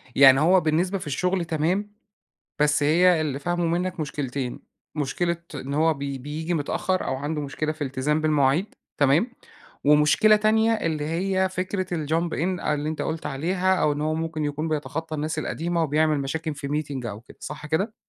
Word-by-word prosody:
يعني 135 -1 +8
هو 180 +5 +5
بالنسبة 170 +5 +1
في 180 - -8
الشغل 180 +5 0
تمام، 170 +6 -1 0.7
بس 150 0 +3
هي 170 +3 +4
اللي 145 -3 -2
فاهمُه 175 +2 -1
مِنك 175 +1 -1
مُشكلتين، 140 -4 -3 0.3
مشكلة 165 +4 -1 0.2
إن 140 0 -5
هو 160 +2 +3
بي 140 -1 -4
بييجي 155 +6 -3
متأخر، 175 +4 -1
أو - - -1
عَنده 150 +3 -3
مُشكلة 150 +2 -2
في 155 -1 -4
التزام 135 +3 0
بالمواعيد، 155 +4 +2 0.2
تمام. 145 - +4 0.6
ومشكلة 150 +9 +5
تانية، 220 +1 +3
اللي 165 -9 -1
هي 190 +4 0
فكرة 185 +1 -2 0.2
الjump 165 +3 0
in 180 +2 -1
أ 150 - +1
اللي 150 +1 -2
أنت 155 - -3
قُلت 160 0 -3
عليها، 180 +7 +1
أو 150 -4 +2
إن 145 - -3
هو 155 +1 0
مُمكن 160 -1 -2
يكون 150 +2 -2
بيتخطى 155 +1 -3
الناس 155 +1 -2
القديمة، 170 +2 -1
وبيعمل 155 0 +2
مشاكل 155 +3 -3
في 140 -1 -6
meeting 145 -4 -3
أو 105 -1 -6
كده. 120 - -17
صح 150 0 -7
كده؟ 190 +8 0
155 Hz, 175 wpm, -25 LUFS, 145-175 Hz, 0.7 s, يعني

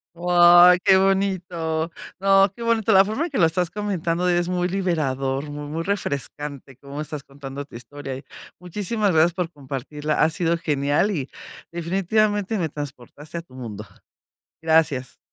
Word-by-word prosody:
¡Guau, 175 +1 +7
qué 190 - +5
bonito! 180 -4 0 0.3
No, 195 0 +5
qué 235 - -7
bonito. 225 -2 +2
La 190 - +8
forma 220 +11 -2
en - - -5
que - - -2
lo 170 - +5
estás 170 +1 0
comentando 180 -4 -1
es 175 0 +1
muy 180 0 0
liberador, 145 -7 -1
mu 145 0 -6
muy 160 +3 -3
refrescante 145 -7 -4
cómo 140 +2 -7
estás 150 -1 -6
contando 140 0 -8
tu 140 - -15
historia. 135 +2 -7
Y 135 - -9 0.3
muchísimas 205 +3 -1
gracias 160 +1 +4
por 180 -2 -3
compartirla, 145 +1 -3
ha - - +4
sido 170 0 0
genial 145 +5 +1
y, 140 -7 -3 0.4
definitivamente, 200 +4 0
me 165 -4 -1
transportaste 145 +3 -8
a - - -7
tu 145 -6 -19
mundo. 115 -5 -7 0.8
Gracias. 160 -6 +1
165 Hz, 155 wpm, -23 LUFS, 145-190 Hz, 0.8 s, La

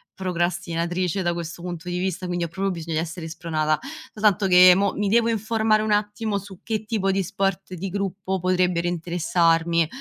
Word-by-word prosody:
procrastinatrice 175 0 -1
da 175 -1 +1
questo 170 0 -6
punto 175 0 -6
di 175 - -2
vista, 185 0 -2
quindi 175 -1 -2
ho - - -1
proprio 195 +4 -2
bisogna 165 -2 -3
essere 165 0 -5
spronata, 155 -2 -1 0.3
soltanto 210 -2 +2
che 180 0 +8
mo 200 +1 +2
mi 205 - -1
devo 230 +3 +3
informare 220 -1 +1
un 215 - -1
attimo 210 0 -1
su 195 -2 -12
che 220 -2 -2
tipo 210 -3 -1
di 195 +1 +1
sport 195 0 -2
di 190 +3 -4
gruppo 190 0 -3
potrebbero 180 -1 +1
interessarmi, 170 -1 +1
180 Hz, 175 wpm, -24 LUFS, 170-200 Hz, 0.3 s, che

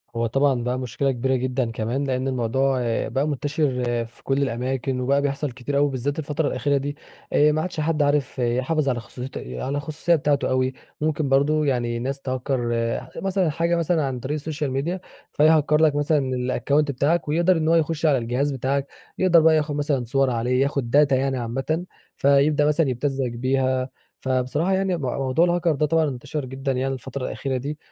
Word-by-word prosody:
هو 115 0 0
طبعًا 135 0 +1
بقى 125 +1 -1
مشكلة 130 +2 -1
كبيرة 130 +2 0
جدًا 125 -2 -1
كمان 115 +5 -2
لأن 130 -1 -1
الموضوع 130 +1 +1 0.3
بقى 135 +3 -1
منتشر 145 -3 -1 0.2
في 115 - -18
كل 135 +1 0
الأماكن، 130 +1 -2
وبقى 140 +3 +2
بيحصل 140 0 -2
كتير 130 +3 -3
أوي 145 0 +3
بالذات 140 +4 -2
الفترة 150 0 -1
الأخيرة 140 +2 0
دي، 145 +1 -3 0.4
آآ 150 +1 +5
ما 155 +1 0
عادش 180 -2 -4
حد 155 0 0
عارف 145 -2 +1
يحافظ 130 +5 +1
على 125 -2 0
خصوصيت 125 +3 -8
على 65 - -4
الخصوصية 155 +4 0
بتاعته 145 -2 +1
أوي، 130 0 +1 0.3
ممكن 155 -2 0
برضه 150 +3 +3
يعني 120 -3 0
ناس 135 +3 -3
تهكَّر 130 +1 -2 0.6
مثلًا 190 -3 +1
حاجة 170 +3 0
مثلًا 170 -1 +1
عن 130 -2 -3
طريق 145 +5 -3
الsocial 150 -3 -3
media 180 +3 -2 0.3
فيهكَّر 150 0 +4
لَك 150 -2 +4
مثلًا 145 -3 +1 0.3
الaccount 145 +4 +3
بتاعَك 150 +6 +1
ويقدر 170 +4 +3
إن 155 0 -1
هو 165 - +4
يخش 160 -1 0
على 145 -4 +4
الجهاز 125 +5 -1
بتاعَك، 135 +1 -1 0.3
يقدر 185 -2 +5
بقى 160 0 +5
ياخد 150 -1 0
مثلًا 145 -4 0
صور 135 +2 +1
عليه 125 +2 0
ياخد 140 -4 -1 0.2
data - - +2
يعني 130 0 +1
عامةً، 135 +9 -2 0.3
فيبدأ 140 +2 +3
مثلًا 150 0 +2
يبتزَّك 130 0 -1
بيها. 130 +1 0 0.3
فبصراحة 130 +8 0
يعني 190 -2 +1
مو 130 -5 -2
موضوع 135 +5 +2
الهاكر 175 -2 +1
ده 150 +2 +1
طبعًا 160 -1 +2
انتشر 140 +2 -5
جدًا 135 +1 -3
يعني 135 +1 -1
الفترة 130 +1 -5
الأخيرة 135 -1 -3
دي، 145 +4 -4
140 Hz, 185 wpm, -23 LUFS, 130-150 Hz, 0.6 s, آآ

